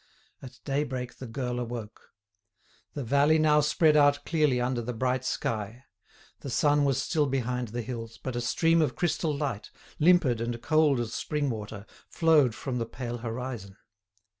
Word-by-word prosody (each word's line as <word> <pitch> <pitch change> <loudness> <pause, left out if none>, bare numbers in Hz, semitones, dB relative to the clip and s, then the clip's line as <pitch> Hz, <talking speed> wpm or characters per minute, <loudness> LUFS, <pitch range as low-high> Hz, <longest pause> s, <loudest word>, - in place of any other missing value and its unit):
At 125 -2 -11
daybreak 135 -3 -2
the 130 - -7
girl 125 +1 -3
awoke. 115 -3 -7 0.9
The 145 - -3
valley 140 +6 +3
now 155 -1 +4
spread 150 +1 +3
out 145 -1 +4
clearly 150 -6 +2
under 125 0 -1
the 120 +1 -5
bright 130 +2 0
sky. 115 0 -3 0.6
The 140 - -7
sun 145 +3 +3
was 135 -2 +1
still 150 +1 +1
behind 125 -2 -2
the 120 +2 -4
hills, 115 -2 -7
but 130 +2 -5
a 120 - -1
stream 165 +7 +2
of 155 - 0
crystal 160 -2 0
light, 135 -8 -3 0.3
limpid 150 -8 +4
and 120 0 -3
cold 155 -2 +3
as 115 -1 -3
spring 145 -3 -1
water, 105 -2 -7 0.2
flowed 155 -8 +3
from 125 -3 -4
the 115 - -2
pale 120 0 -5
horizon. 115 -4 -6
130 Hz, 165 wpm, -28 LUFS, 120-145 Hz, 0.9 s, now